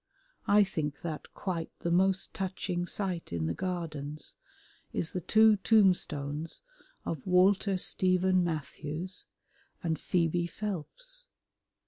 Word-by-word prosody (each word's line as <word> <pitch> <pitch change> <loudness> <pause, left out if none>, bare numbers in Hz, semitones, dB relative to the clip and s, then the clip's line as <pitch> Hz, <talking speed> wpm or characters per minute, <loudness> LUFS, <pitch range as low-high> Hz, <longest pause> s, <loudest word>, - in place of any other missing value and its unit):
I 205 +1 +7
think 150 -6 -3
that 160 -3 -5
quite 175 -4 -3
the 170 - 0
most 190 +2 +2
touching 180 -2 -2
sight 185 -4 -2
in 85 -2 -1
the 80 - 0
Gardens 155 - -3 0.6
is 165 - -2
the 180 - -3
two 220 +4 +6
tombstones 165 - +2 0.4
of 160 -2 -4
Walter 190 +2 +4
Stephen 185 0 +2
Matthews 160 +2 -4 0.6
and 160 -3 0
Phoebe 170 0 +1
Phelps. - - -5
180 Hz, 110 wpm, -31 LUFS, 160-190 Hz, 0.6 s, I